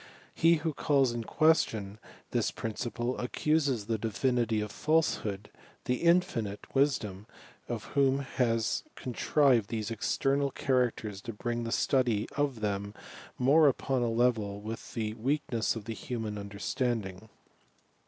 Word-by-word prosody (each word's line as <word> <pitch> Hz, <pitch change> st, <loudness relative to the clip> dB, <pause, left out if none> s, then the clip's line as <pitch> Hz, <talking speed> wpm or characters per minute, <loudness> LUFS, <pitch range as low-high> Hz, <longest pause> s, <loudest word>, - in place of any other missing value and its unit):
He 165 Hz, +1 st, +5 dB
who 160 Hz, 0 st, -2 dB
calls 135 Hz, -3 st, +2 dB
in 120 Hz, -1 st, -4 dB
question 110 Hz, -11 st, +2 dB, 0.3 s
this -, -, +1 dB
principle, 120 Hz, +2 st, -3 dB
accuses 140 Hz, -3 st, 0 dB
the 110 Hz, 0 st, -1 dB
Divinity 115 Hz, 0 st, 0 dB
of 105 Hz, -1 st, -3 dB
falsehood, 110 Hz, -10 st, 0 dB, 0.3 s
the 125 Hz, -, +1 dB
infinite 125 Hz, -, +1 dB
wisdom 110 Hz, -8 st, 0 dB, 0.4 s
of -, -, -3 dB
whom 140 Hz, 0 st, +2 dB
ba« 120 Hz, -3 st, +2 dB, 0.4 s
contrived 125 Hz, -3 st, +2 dB
these 110 Hz, -1 st, -3 dB
external 140 Hz, +5 st, +1 dB
characters 120 Hz, -7 st, -1 dB
to 115 Hz, -, -6 dB
bring 120 Hz, +2 st, -3 dB
the 115 Hz, -, -3 dB
study 120 Hz, -6 st, +1 dB
of 140 Hz, -6 st, -1 dB
them 100 Hz, 0 st, -2 dB, 0.4 s
more 145 Hz, +5 st, +5 dB
upon 135 Hz, -1 st, +1 dB
a 120 Hz, -, +1 dB
level 115 Hz, -4 st, +1 dB
with 110 Hz, +2 st, -7 dB
the 110 Hz, -2 st, -2 dB
weakness 120 Hz, -1 st, -1 dB
of 110 Hz, -1 st, -7 dB
ua 115 Hz, -, -2 dB
human 110 Hz, -4 st, -4 dB
understanding. 100 Hz, 0 st, -3 dB
120 Hz, 130 wpm, -30 LUFS, 105-135 Hz, 0.4 s, He